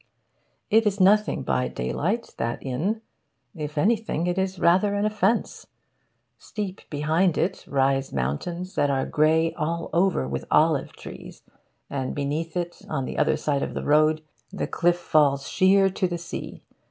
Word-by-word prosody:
It 225 0 +5
is 205 0 0
nothing 205 +3 +3
by 65 -2 0
daylight, 145 - -2
that 115 - -2
inn. 180 - -2 0.5
If 150 -2 -6
anything, 210 -2 +1
it 180 +1 0
is 190 0 -1
rather 185 +4 +3
an 205 +1 0
offence. 215 +1 0 0.7
Steep 205 -3 -6
behind 155 +4 +1
it 185 +3 -1
rise 135 0 +1
mountains 170 - -3
that 145 - +1
are 135 -1 0
grey 160 +2 +2
all 170 +2 -3
over 170 - +2
with 65 0 -4
olive - - +2
trees, - - -11 0.4
and 135 -2 -3
beneath 155 +4 -2
it, 175 -1 -4
on 135 -4 -2
the - - -4
other 150 0 +2
side 145 -2 -1
of - - -4
the - - -3
road, 155 +1 +3 0.3
the - - -3
cliff 175 +1 +1
falls 145 -5 +2
sheer 195 +1 +4
to 185 - 0
the 175 -1 -3
sea. 170 +1 -7
165 Hz, 155 wpm, -25 LUFS, 145-190 Hz, 0.7 s, It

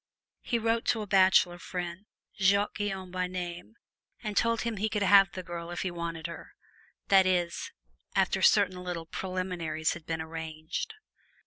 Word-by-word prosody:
He 240 - 0
wrote 230 0 0
to 220 -2 +1
a - - -5
bachelor 185 -3 +4
friend, 180 +3 -5 0.3
Jacques 200 +2 +2
Guyon 190 -3 -3
by 185 0 -1
name, 180 +3 -6 0.5
and 210 -2 -3
told 230 +1 +2
him 230 -2 -2
he 215 +3 0
could 210 -2 0
have 195 -1 +7
the 185 - -6
girl 170 0 -6
if 175 - -3
he 185 - -2
wanted 170 -2 -5
her 170 0 -8 0.5
that 190 -1 +6
is, 175 -2 0 0.4
after - - +2
certain 185 -3 +4
little 175 -2 -4
preliminaries 175 -3 -2
had 170 -2 -11
been 160 -1 -2
arranged. 160 - -5
185 Hz, 160 wpm, -29 LUFS, 170-200 Hz, 0.5 s, have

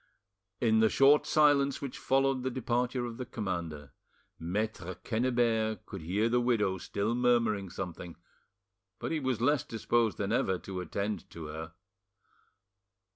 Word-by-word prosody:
In 110 -2 +3
the 110 0 +5
short 140 +5 +5
silence 145 -2 +4
which 135 -3 -6
followed 135 -1 +2
the 130 - -1
departure 125 0 -1
of 115 -1 -6
the 125 - -4
commander, 85 - -4 0.5
Maitre 95 +1 -3
Quennebert 115 -2 0
could 100 -4 -8
hear 95 +8 0
the 120 +1 +2
widow 105 -6 +1
still 100 +5 -2
murmuring 115 -5 +2
something, 85 -2 -6 0.8
but - - -4
he 160 - 0
was 130 -5 -1
less 145 +2 +3
disposed 115 0 0
than 100 0 -2
ever 95 -5 +1
to 95 0 -6
attend 100 +2 -3
to 85 -2 -8
her. 80 +1 -7
110 Hz, 140 wpm, -31 LUFS, 95-125 Hz, 0.8 s, the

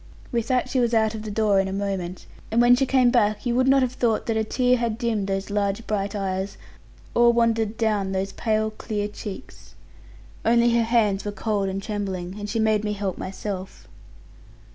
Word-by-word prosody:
With 235 -1 -1
that 255 -1 +1
she 255 0 0
was 235 -1 +2
out 220 -1 +2
of 220 - -5
the 215 - -6
door 210 -1 +2
in 195 - +1
a - - -4
moment; 190 -2 -3 0.2
and 225 - +1
when 240 +1 +7
she 270 +1 +1
came 255 -2 +4
back, 215 -3 +1
you 240 - +1
would 255 +2 +2
not 270 0 +5
have 250 -1 -1
thought 230 -4 0
that 225 - -1
a 220 - +1
tear 250 +3 +2
had 230 -2 -1
dimmed 225 -4 -1
those 195 +1 -2
large 205 +1 -1
bright 200 -1 -2
eyes, 190 0 -3 0.6
or 240 0 +5
wandered 225 -2 +1
down 210 -4 0
those 195 +1 -2
pale 220 -1 0
clear 210 -1 -3
cheeks. 210 +2 -9 0.7
Only 235 +1 +4
her 235 -1 +3
hands 215 -4 +2
were 205 - -3
cold 205 -2 -1
and 195 +1 -4
trembling: 195 -3 -4
and 205 0 -5
she 230 - -2
made 215 -1 +2
me 210 -1 -1
help 195 -2 -3
myself. 190 0 -6
215 Hz, 205 wpm, -24 LUFS, 200-235 Hz, 0.7 s, when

